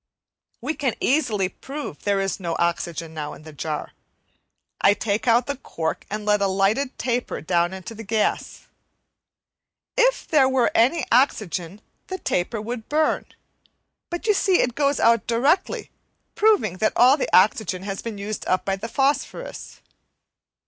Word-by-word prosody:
We 275 +6 -2
can 270 -7 -1
easily 235 -9 +1
prove 275 - -7
that - - -22
there 200 -1 +2
is 195 +1 -2
no 170 -3 -3
oxygen 170 -1 -2
now 150 -2 -5
in - - -15
the 155 0 -11
jar. 150 +1 -4 0.9
I 200 - +5
take 210 +2 -2
out 235 +1 +4
the 280 -2 -3
cork 160 -10 -4
and 210 +1 -4
let 210 -1 +2
a 200 - +3
lighted 200 +8 +1
taper 245 0 -2
down 175 +1 +1
into 190 +3 -8
the 225 0 -9
gas. 215 0 -1 1.3
If - - +2
there 275 -4 +4
were 260 -2 +2
any 260 +5 +3
oxygen 205 - +1 0.3
the 375 - -4
taper 215 - -1
would 225 +1 -6
burn, 310 +1 +1 0.8
but 345 +4 -5
you 425 - +4
see 385 -2 +3
it 245 - 0
goes 280 +1 +1
out 230 -1 +3
directly 275 - +1 0.4
proving 410 - +2
that 215 +2 +1
all 255 +3 +6
the 290 - -2
oxygen 190 -2 +3
has 195 -1 -4
been 230 -3 -6
used 205 +2 -4
up 185 - +1
by 195 0 0
the 215 +4 -5
phosphorous. 285 - -2
220 Hz, 160 wpm, -23 LUFS, 190-275 Hz, 1.3 s, all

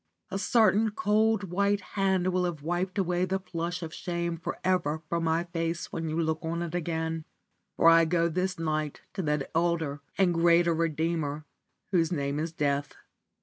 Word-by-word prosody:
A 195 - -2
certain 220 -1 +4
cold 210 -2 +1
white 200 +2 +2
hand 190 -2 +1
will 180 0 +2
have 165 -5 -4
wiped 175 +4 -2
away 180 -2 +1
the 185 +1 0
flush 175 -1 -4
of 160 0 -6
shame 170 -1 -2
for 165 - -5
ever 165 -4 +1
from 170 +1 -1
my 165 +1 +2
face 170 -1 -3
when 165 -1 -2
you 160 +2 -1
look 160 -1 0
on 170 +1 -2
it 170 -1 -5
again, 160 -1 -2 0.5
for - - +5
I 165 0 +7
go 170 0 +2
this 180 +2 -1
night 155 -2 -2
to 195 - -2
that 150 -4 -1
elder 165 -4 0 0.2
and 185 -3 +3
greater 170 0 +4
redeemer 160 -2 -1 0.5
whose 170 -3 +2
name 140 -3 -1
is 160 +1 -2
death. 145 -3 -1
170 Hz, 175 wpm, -28 LUFS, 160-180 Hz, 0.5 s, I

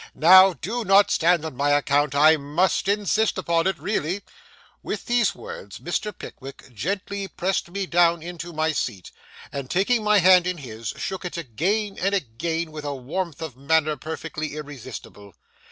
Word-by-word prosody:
Now, 185 +3 +8
do 230 +9 -4
not 200 0 +5
stand 170 -1 +3
on 155 - -6
my 145 +3 0
account. 145 0 +2
I 155 +3 +6
must 155 +7 0
insist 205 +1 +1
upon 170 -2 +1
it, 190 -2 0
really.' 195 -1 -2 0.6
With - - -5
these 240 -3 +2
words 475 +1 -9
Mr. 210 - -3
Pickwick 135 -8 -11
gently 195 - -3
pressed 190 -1 -2
me 195 +2 -3
down 170 -2 +3
into 175 0 -7
my 155 0 0
seat, 105 - -4 0.4
and 140 -2 -5
taking 215 +5 +1
my 210 0 +4
hand 180 -1 +6
in 180 -1 -2
his, 115 -6 -8
shook 190 -1 -4
it 180 -1 -5
again 190 - -2
and 195 +2 +1
again 160 - -3
with 155 -1 -7
a 145 -1 -3
warmth 160 +5 -4
of 155 -7 -6
manner 155 +3 +1
perfectly 155 -1 -6
irresistible. 130 -8 -9
170 Hz, 165 wpm, -24 LUFS, 145-190 Hz, 0.6 s, Now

